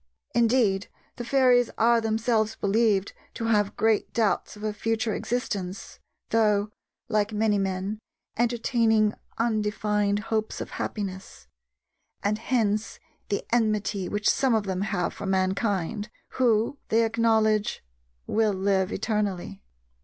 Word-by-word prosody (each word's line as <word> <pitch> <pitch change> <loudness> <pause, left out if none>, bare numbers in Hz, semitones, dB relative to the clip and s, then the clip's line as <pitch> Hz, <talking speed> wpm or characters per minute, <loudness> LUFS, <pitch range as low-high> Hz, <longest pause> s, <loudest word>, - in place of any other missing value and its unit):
Indeed, 230 -5 +2 0.3
the 240 - -4
fairies 250 -1 +4
are 235 0 +4
themselves 220 0 0
believed 205 -1 +1 0.2
to 230 - -3
have 210 -3 +1
great 220 -1 +2
doubts 220 -2 0
of 210 - -11
a 215 -1 -1
future 225 +1 -1
existence, 200 -7 -4 0.3
though, 210 -2 +2 0.4
like 215 -2 +1
many 210 -1 +1
men, 195 +2 -2 0.4
entertaining 230 -2 +2 0.2
undefined 210 -2 0 0.2
hopes 220 0 -1
of - - -6
happiness; 190 -2 -5 0.8
and 210 +1 0
hence 220 -3 0 0.3
the 200 - -1
enmity 210 -4 0
which 210 +1 -1
some 260 -4 +3
of 220 - +1
them 190 -1 -3
have 195 -4 -1
for 200 - -6
mankind, 195 +2 0 0.2
who, 240 +2 +1
they 225 +1 +3
acknowledge, 220 -2 +1 0.4
will 220 -1 +1
live 190 0 +1
eternally. 200 - -2
215 Hz, 120 wpm, -26 LUFS, 200-225 Hz, 0.8 s, fairies